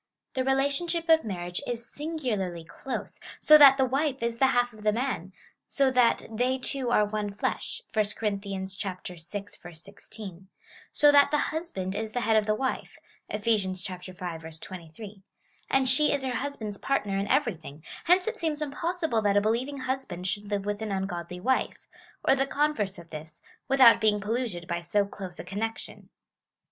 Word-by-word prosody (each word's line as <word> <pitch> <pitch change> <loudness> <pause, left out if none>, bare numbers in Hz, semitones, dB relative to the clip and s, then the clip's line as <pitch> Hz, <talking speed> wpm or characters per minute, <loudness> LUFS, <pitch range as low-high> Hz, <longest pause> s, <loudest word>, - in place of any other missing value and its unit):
The 260 - 0
relationship 285 +6 +1
of 320 0 +6
marriage 175 -3 -4
is 235 0 -4
singularly 245 - -3
close, 260 +10 -6 0.2
so 305 - +7
that 275 -2 +9
the 265 - +4
wife 270 0 0
is 235 0 -1
the 265 - +6
half 245 -2 +2
of 215 - -13
the 210 0 +3
man 225 -6 -2 0.2
— - - -42
so 275 -2 +4
that 250 -2 +3
they 250 +4 0
two 260 -1 -3
are 210 -3 +4
one 205 0 -3
flesh 200 - -3
— - - -34
(1 215 -1 +3
Cor. 215 -2 +1
vi. 195 -1 -4
16) 190 +1 -8
— - - -23
so 295 0 +6
that 285 -1 +6
the 300 - +2
husband 295 - -2
is 220 +1 -3
the 245 - -1
head 225 -1 +2
of 215 -1 +3
the 215 - +2
wife; 260 +3 -3 0.3
(Eph. 210 0 -4
V. 225 -2 +3 0.2
23;) 180 +1 -8 0.5
and 270 -1 +3
she 290 +4 +3
is 285 -2 -1
her 255 -2 -2
husband's 225 -7 -4
partner 210 -8 0
in 200 - -2
everything; 170 - -1 0.2
hence 360 +2 +5
it 450 -1 -3
seems 310 -2 -1
impossible 320 -3 -1
that 205 -1 +2
a - - +5
believing 240 +7 0
husband 255 -9 -3
should 205 +2 -3
live 200 -1 -1
with 205 +1 -2
an 220 -2 -3
ungodly 180 -2 -3
wife, 260 +7 0 0.4
or - - +7
the 270 0 +1
converse 280 -10 0
of 170 -1 -13
this, 155 0 -9 0.2
without 265 -3 +7
being 210 -1 +3
polluted 210 -5 -2
by 170 -1 -2
so 200 +4 +1
close 190 -3 -8
a - - -6
connection. 210 +5 -5
220 Hz, 175 wpm, -28 LUFS, 190-270 Hz, 0.5 s, that